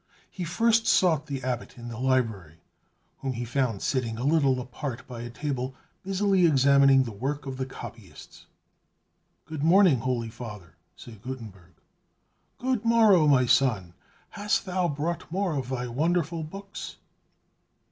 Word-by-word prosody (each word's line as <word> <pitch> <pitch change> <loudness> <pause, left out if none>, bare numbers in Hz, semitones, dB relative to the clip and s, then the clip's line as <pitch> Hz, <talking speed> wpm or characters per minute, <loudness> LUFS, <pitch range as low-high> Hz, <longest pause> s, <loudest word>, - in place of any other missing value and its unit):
He 180 - -5
first 225 +6 +2
sought 160 -5 +3
the 135 -3 -4
Abbot 125 0 -4
in 120 0 -9
the 115 -1 -7
library, 115 - 0 0.6
whom 135 -1 -3
he 120 0 -4
found 120 -4 -1
sitting 120 -4 -1
a 120 - -4
little 140 -3 +3
apart 125 0 -6
by 120 -2 -7
a 120 - -6
table, 130 0 -4 0.3
busily 195 -1 +2
examining 140 -2 +5
the 120 - -6
work 135 +7 -4
of 135 -1 -5
the 130 0 -3
copyists. 115 - -11 1.0
"Good 155 -2 -6
morning, 170 -4 +5
holy 120 -1 -2
Father!" 105 -7 -9 0.2
said 110 -4 -13
Gutenberg. 105 -9 -9 0.8
"Good 255 -3 -1
morrow, 220 -8 +5
my 130 -3 +5
son: 120 -8 +2 0.4
hast 205 +1 -1
thou 185 -1 0
brought 160 +3 -3
more 190 -1 0
of 135 -3 -3
thy 125 -2 -2
wonderful 165 +6 0
books?" 195 +5 -8
135 Hz, 145 wpm, -27 LUFS, 120-170 Hz, 1.0 s, examining